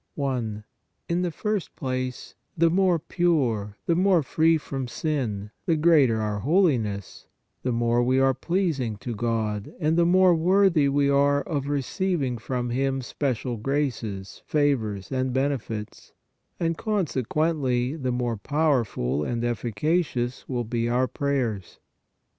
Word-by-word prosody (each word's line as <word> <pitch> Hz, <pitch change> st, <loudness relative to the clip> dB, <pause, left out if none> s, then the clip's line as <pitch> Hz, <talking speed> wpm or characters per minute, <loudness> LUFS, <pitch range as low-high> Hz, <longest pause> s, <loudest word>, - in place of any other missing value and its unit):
i. 120 Hz, -6 st, -2 dB, 0.4 s
In 170 Hz, +1 st, 0 dB
the 180 Hz, -, 0 dB
first 210 Hz, +3 st, -3 dB
place, 130 Hz, -2 st, -4 dB, 0.2 s
the 165 Hz, 0 st, +4 dB
more 185 Hz, -1 st, +3 dB
pure, 140 Hz, -, 0 dB
the 170 Hz, -, +2 dB
more 185 Hz, -2 st, +3 dB
free 160 Hz, +4 st, +3 dB
from 135 Hz, -4 st, -5 dB
sin, 120 Hz, -8 st, -3 dB, 0.2 s
the 165 Hz, -, +3 dB
greater 150 Hz, -8 st, +4 dB
our 105 Hz, -1 st, -2 dB
holiness, 125 Hz, -, 0 dB, 0.3 s
the 125 Hz, -, -1 dB
more 120 Hz, 0 st, +1 dB
57 125 Hz, +1 st, +2 dB
58 -, -, +3 dB
PRAYER 135 Hz, -, +4 dB
we -, -, +5 dB
are 135 Hz, -, +3 dB
pleasing 150 Hz, -, -1 dB
to 115 Hz, +3 st, -5 dB
God, 110 Hz, -2 st, -2 dB
and 155 Hz, -1 st, +1 dB
the 170 Hz, -, +5 dB
more 185 Hz, 0 st, +5 dB
worthy 170 Hz, -3 st, +3 dB
we 140 Hz, 0 st, +2 dB
are 140 Hz, 0 st, +3 dB
of 145 Hz, -5 st, -3 dB
receiving 145 Hz, -, -1 dB
from 120 Hz, +3 st, -3 dB
Him 135 Hz, +1 st, 0 dB
special 125 Hz, -2 st, -2 dB
graces, 115 Hz, -7 st, -3 dB
favors 115 Hz, -10 st, 0 dB
and 130 Hz, -1 st, 0 dB
benefits, 130 Hz, -6 st, -3 dB, 0.5 s
and, 165 Hz, -1 st, 0 dB
consequently, 150 Hz, -, 0 dB
the 130 Hz, -5 st, -2 dB
more 120 Hz, -2 st, -1 dB
powerful 115 Hz, -, 0 dB
and 120 Hz, +6 st, -2 dB
efficacious 120 Hz, -, -1 dB
will 125 Hz, -2 st, -1 dB
be 115 Hz, +1 st, -1 dB
our 125 Hz, +2 st, +2 dB
prayers. 125 Hz, -11 st, -2 dB
130 Hz, 140 wpm, -25 LUFS, 120-160 Hz, 0.5 s, we